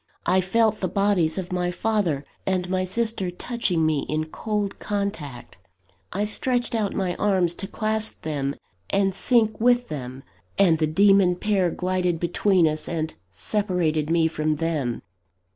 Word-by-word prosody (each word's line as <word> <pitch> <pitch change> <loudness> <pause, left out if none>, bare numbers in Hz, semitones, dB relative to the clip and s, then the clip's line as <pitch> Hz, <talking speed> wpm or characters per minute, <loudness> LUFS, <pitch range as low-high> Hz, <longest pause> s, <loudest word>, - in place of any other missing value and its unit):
I 185 +1 +3
felt 215 +3 +2
the 185 - 0
bodies 195 -6 +1
of 185 -1 -4
my 180 -1 0
father 180 -7 0 0.2
and 185 -1 0
my 185 0 +1
sister 215 -1 -1
touching 180 -3 -1
me 155 -2 +2
in 155 +1 0
cold 210 -2 -3
contact: 200 - -4 0.5
I 205 +3 -1
stretched 245 +3 0
out 215 -3 -1
my 180 -2 -1
arms 185 -4 +2
to 195 - -4
clasp 220 +1 -1
them 140 -3 -2 0.3
and 195 -1 +2
sink 220 +1 +2
with 245 +1 +3
them; 130 -2 -6 0.3
and 175 -5 +4
the 155 - +2
demon 195 +2 +4
pair 190 -1 +1
glided 180 -1 -1
between 175 0 +2
us, 155 0 -2
and 160 -2 -2 0.2
separated 165 - -1
me 165 -1 +3
from 155 -1 -1
them. 150 -6 -2
185 Hz, 150 wpm, -24 LUFS, 160-205 Hz, 0.5 s, and